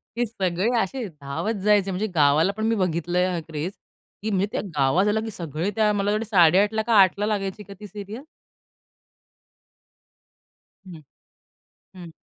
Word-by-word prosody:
की 240 Hz, 0 st, 0 dB
सगळे 190 Hz, -1 st, -1 dB
असे 225 Hz, +4 st, -3 dB
धावत 140 Hz, +11 st, -3 dB
जायचे 205 Hz, -2 st, +3 dB
म्हणजे 200 Hz, +4 st, -2 dB
गावाला 150 Hz, +5 st, +4 dB
पण 220 Hz, -, -1 dB
मी 225 Hz, 0 st, +2 dB
बघितलंय 180 Hz, -1 st, 0 dB
हा 180 Hz, -2 st, -2 dB
क्रेज. 160 Hz, +4 st, -4 dB, 0.5 s
की 220 Hz, -, -1 dB
मी 195 Hz, 0 st, +1 dB
त्या -, -, -2 dB
गावात 145 Hz, +9 st, +2 dB
आले 215 Hz, +1 st, +1 dB
की 225 Hz, 0 st, -5 dB
सगळे 165 Hz, +1 st, -3 dB
त्या 215 Hz, -1 st, +3 dB
मला 205 Hz, 0 st, 0 dB
वाटतं 215 Hz, +2 st, -1 dB
8.30 200 Hz, +3 st, +4 dB
का 230 Hz, -, +2 dB
8.00 200 Hz, +2 st, +2 dB
लागायची 205 Hz, -1 st, -3 dB
का 200 Hz, -, -11 dB
ती 210 Hz, -, -9 dB
सीरियल? 210 Hz, +6 st, -8 dB, 2.6 s
हं, 165 Hz, -4 st, -10 dB, 0.9 s
हं. 175 Hz, -3 st, -10 dB
195 Hz, 150 wpm, -24 LUFS, 175-210 Hz, 2.6 s, गावाला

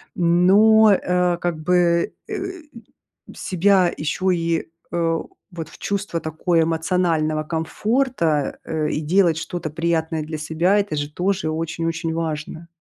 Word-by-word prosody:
Но, 200 Hz, +6 st, +5 dB
э, 180 Hz, -2 st, +1 dB
как 175 Hz, -2 st, -2 dB
бы, 170 Hz, 0 st, +2 dB
э, 425 Hz, -, -4 dB, 1.0 s
себя 185 Hz, -1 st, +2 dB
еще 155 Hz, +4 st, -3 dB
и, 165 Hz, -1 st, -1 dB, 0.2 s
э, 165 Hz, -1 st, 0 dB, 0.3 s
вот 165 Hz, -3 st, -6 dB
в -, -, -15 dB
чувство 200 Hz, -4 st, -2 dB
такое 160 Hz, +2 st, +1 dB
эмоционального 160 Hz, -2 st, 0 dB
комфорта, 165 Hz, -, -1 dB
э, 155 Hz, -1 st, -1 dB
и 150 Hz, -, -2 dB
делать 170 Hz, +1 st, +3 dB
что-то 170 Hz, 0 st, -4 dB
приятное 160 Hz, 0 st, -1 dB
для 155 Hz, +1 st, -5 dB
себя- 160 Hz, +6 st, +1 dB
это 200 Hz, -6 st, -2 dB
же 145 Hz, 0 st, -4 dB
тоже 190 Hz, 0 st, -1 dB
очень-очень 165 Hz, +1 st, -2 dB
важно. 160 Hz, 0 st, -4 dB
165 Hz, 125 wpm, -21 LUFS, 160-180 Hz, 1.0 s, Но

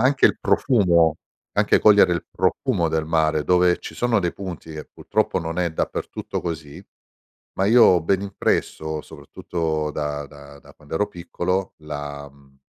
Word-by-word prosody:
Anche 135 Hz, +3 st, +4 dB
il -, -, 0 dB
profumo, 85 Hz, -, +3 dB, 0.4 s
anche -, -, +3 dB
cogliere 100 Hz, -4 st, +6 dB
il 85 Hz, -, -2 dB
profumo 85 Hz, -1 st, 0 dB
del 80 Hz, 0 st, -1 dB
mare, 80 Hz, -1 st, +1 dB
dove 90 Hz, +1 st, +3 dB
ci -, -, -9 dB
sono 120 Hz, -4 st, +1 dB
dei 85 Hz, -2 st, -1 dB
punti, 90 Hz, -4 st, -8 dB
che 75 Hz, -1 st, -7 dB
purtroppo -, -, -1 dB
non 80 Hz, +1 st, -4 dB
è 85 Hz, -2 st, 0 dB
dappertutto -, -, -4 dB
così, 80 Hz, -4 st, -6 dB, 0.7 s
ma 95 Hz, -, +2 dB
io 115 Hz, +4 st, +6 dB
ho 90 Hz, -2 st, +5 dB
ben 95 Hz, +4 st, +1 dB
impresso, 80 Hz, -5 st, -2 dB
soprattutto 80 Hz, -3 st, -4 dB
da 75 Hz, -1 st, -3 dB
da 70 Hz, -1 st, -14 dB
da -, -, -18 dB
quando 75 Hz, +1 st, -9 dB
ero 105 Hz, -, +1 dB
piccolo, 90 Hz, 0 st, -3 dB
la, 70 Hz, -2 st, -7 dB
mhmm 70 Hz, -1 st, -24 dB
80 Hz, 160 wpm, -22 LUFS, 75-90 Hz, 0.7 s, cogliere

